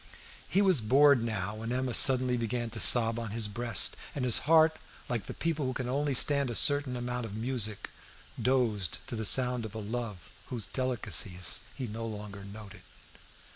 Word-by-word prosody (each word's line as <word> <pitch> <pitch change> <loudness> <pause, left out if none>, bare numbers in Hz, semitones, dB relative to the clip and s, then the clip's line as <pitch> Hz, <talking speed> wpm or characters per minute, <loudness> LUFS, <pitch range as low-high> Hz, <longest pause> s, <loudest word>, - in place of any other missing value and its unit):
He 195 +6 +2
was 185 - +3
bored 135 +3 +4
now 105 -4 -3
when 115 +2 -6
Emma 130 0 -2
suddenly 130 0 +4
began 120 0 -3
to 115 - -6
sob 115 0 +5
on 115 -2 -5
his 110 0 -2
breast, 115 +3 0 0.2
and 135 -3 -2
his 125 - +4
heart, 160 -1 +4 0.3
like 115 -4 -4
the - - -6
people 160 -4 -2
who 130 - -3
can 125 0 -5
only 140 +2 -1
stand 140 +1 +3
a 120 - -4
certain 145 -2 +3
amount 125 0 -4
of 100 - -9
music, 110 -3 -3 0.5
dozed 115 -8 0
to 130 - -6
the 110 -1 -4
sound 125 0 +2
of 110 -1 -8
a - - -5
love 110 -4 -6 0.2
whose 120 -5 -4
delicacies 105 - 0 0.2
he 130 - -5
no 115 +1 -6
longer 105 -2 -8
noted. 100 0 -12
120 Hz, 180 wpm, -29 LUFS, 110-130 Hz, 0.5 s, sob